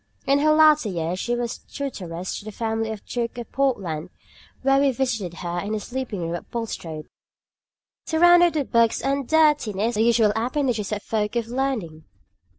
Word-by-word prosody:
In 275 +1 +3
her 305 +1 +4
latter 305 -6 +5
years 175 0 -2
she 240 +4 -1
was 240 -1 -3
tutoress 185 -10 -5
in - - -16
the - - -5
family 225 +1 -2
of 220 -2 -5
the - - -36
Duke 240 -1 -3
of 240 - -7
Portland, 185 - -1 0.5
where 270 0 +4
we 280 0 +4
visited 230 -9 -2
her 175 0 -3
in 205 +4 -3
her 215 - -1
sleeping 240 -3 -5
room 165 0 -3
at 175 - -6
Bulstrode, 165 -9 -5 1.0
surrounded 350 +1 +5
with 290 -4 -2
books 230 -1 +3
and 275 -1 -1
dirtiness, 265 -9 +2
the 215 - 0
usual 225 -2 +4
appendages 240 -3 -1
of 205 -1 -3
folk 210 0 -2
of 230 -1 -1
learning!" 235 -12 -3
230 Hz, 175 wpm, -23 LUFS, 200-270 Hz, 1.0 s, latter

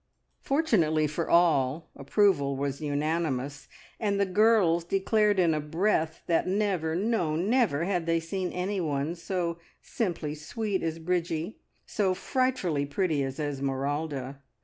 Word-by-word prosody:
Fortunately 185 - +2
for 150 +3 -3
all, 160 -3 +3
approval 140 -2 +2
was 140 +1 -3
unanimous, 145 -2 -2 0.3
and 200 -2 0
the 200 - +3
girls 190 -4 +3
declared 205 +3 +2
in 170 -3 +3
a 155 - 0
breath 160 +1 0
that 170 +1 +1
never, 185 -5 0
no 185 -5 0
never, 195 - +2
had 175 -2 -1
they 165 0 +2
seen 180 +3 -3
anyone 170 -6 -1
so 170 -1 -3 0.2
"simply 170 -8 -3
sweet" 200 +6 -3
as 165 0 -2
Bridgie, 170 +2 -2 0.3
so 190 -3 0
"frightfully 190 - 0
pretty" 155 0 0
as 135 +1 -4
Esmeralda. 140 -1 -3
165 Hz, 125 wpm, -28 LUFS, 150-195 Hz, 0.3 s, all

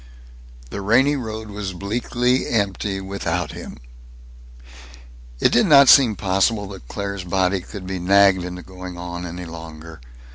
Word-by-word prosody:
The 100 - -5
rainy 130 +8 +3
road 110 -4 -6
was 100 -2 -5
bleakly 120 +6 -1
empty 100 -2 -1
without 90 -3 -3
him. - - -9 1.6
It - - +3
did 215 - +3
not 140 -4 +7
seem 120 -6 +7
possible 100 +3 0
that 95 -11 -11
Claire's 100 +2 -5
body 95 +1 0
could 95 +1 -9
be 95 0 -4
nagged 95 0 +4
into 90 0 -7
going 90 -1 -9
on 90 0 -6
any 90 +1 -7
longer. 80 -2 -10
95 Hz, 140 wpm, -21 LUFS, 90-105 Hz, 1.6 s, not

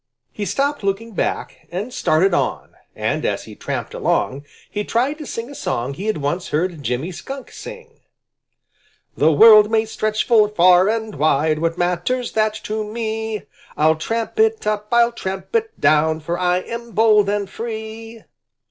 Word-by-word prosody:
He 205 - -4
stopped 285 +6 -1
looking 200 +4 -2
back - - -3
and 205 +8 -4
started 175 0 +2
on, - - -1 0.2
and - - -1
as - - -1
he - - -11
tramped - - -5
along, 140 +2 -1 0.2
he 210 - -3
tried 260 +8 0
to 305 - -7
sing 230 +4 -5
a - - -8
song 125 - -3
he 190 +9 -6
had 215 - 0
once 155 +5 -2
heard 165 0 -1
Jimmy 130 +7 -2
Skunk 270 +9 -8
sing: 470 -1 -11 1.2
"The 155 +2 +4
world 215 +5 +8
may 220 0 +2
stretch 215 0 -1
full 220 -3 +5
far 185 -1 +5
and 220 -1 -2
wide 155 +1 +2
What 165 +1 -1
matters 180 +9 -1
that 215 0 +1
to 215 0 -2
me? 220 0 -4 0.3
I'll 155 +1 +4
tramp 225 - -3
it 445 0 +2
up; 210 0 -1
I'll 235 0 +4
tramp 190 - -6
it 445 -1 -1
down! 155 +1 +3
For 170 +2 -3
I 180 0 +1
am 235 +2 -7
bold 215 -2 +4
and 205 -1 -1
free." 225 0 -7
210 Hz, 165 wpm, -20 LUFS, 175-230 Hz, 1.2 s, world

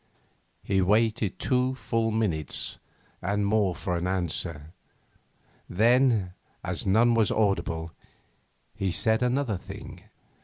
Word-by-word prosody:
He 95 -1 +1
waited 110 +2 +2
two 130 0 +1
full 115 -2 -1
minutes 95 - -2 0.4
and 100 +2 0
more 100 -3 +2
for 90 - -2
an 85 +1 -2
answer; 85 -4 -3 1.0
then, 115 -2 +3 0.3
as - - -3
none 115 +5 +4
was 115 -2 +3
audible, 90 -6 0 0.8
he 95 -2 -2
said 110 +5 +2
another 125 -4 0
thing. - - -10
105 Hz, 110 wpm, -27 LUFS, 90-115 Hz, 1.0 s, none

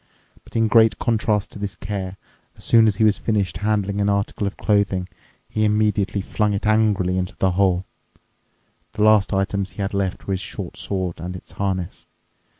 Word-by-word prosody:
But - - -18
in 115 -1 +3
great 110 0 +5
contrast 110 -3 0
to - - -9
this 100 -1 -4
care, 95 -2 -5 0.4
as - - -12
soon 115 -1 +5
he 105 +1 +2
was 105 -1 +3
finished 100 -6 0
handling 100 0 0
an 100 - +2
article 100 0 0
of 100 - -5
clothing, 100 -3 +1 0.4
he 110 - -1
immediately 105 -1 +1
flung 105 +1 0
it 100 - -3
angrily 105 -4 +2
into 90 0 -4
the 95 - +1
hole. 95 -1 +2 1.1
The 105 - 0
last 110 -2 +5
items 95 0 -1
he 100 - -4
had 100 - -3
left 95 -2 -2
were 100 - -1
his 95 - -2
short - - -6
sword 95 -4 -3
and 90 +3 -5
its 90 - -10
harness. 95 -2 -3
100 Hz, 180 wpm, -22 LUFS, 95-105 Hz, 1.1 s, great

